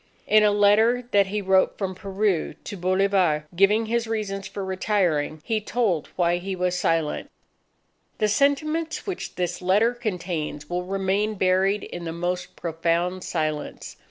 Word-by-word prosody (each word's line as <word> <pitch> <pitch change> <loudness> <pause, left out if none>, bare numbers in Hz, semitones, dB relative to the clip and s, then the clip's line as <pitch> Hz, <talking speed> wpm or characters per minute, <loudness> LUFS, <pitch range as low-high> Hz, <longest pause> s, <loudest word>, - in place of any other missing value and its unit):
In 215 0 +5
a 210 - +5
letter 215 +4 +3
that 200 -1 +4
he 205 +1 -3
wrote 190 0 +3
from 190 -2 -2
Peru 195 -2 -1
to - - -6
Bolivar, 185 -4 +2
giving 205 +5 +4
his 230 +1 -1
reasons 200 -3 -3
for 195 0 -5
retiring, 180 -6 0
he 220 -1 0
told 210 -8 0
why 175 -1 +2
he 190 +2 -4
was 180 0 0
silent: 165 -3 0 0.9
"_The 215 - +3
sentiments 305 +7 +1
which 385 -3 -5
this 180 0 -2
letter 205 +6 +3
contains 175 -10 -4
will 180 +2 -3
remain 195 +3 0
buried 190 +2 +2
in 175 -1 -7
the 165 - -4
most 180 +1 -3
profound 170 +2 -1
silence. 155 -3 -3
190 Hz, 150 wpm, -24 LUFS, 175-210 Hz, 0.9 s, In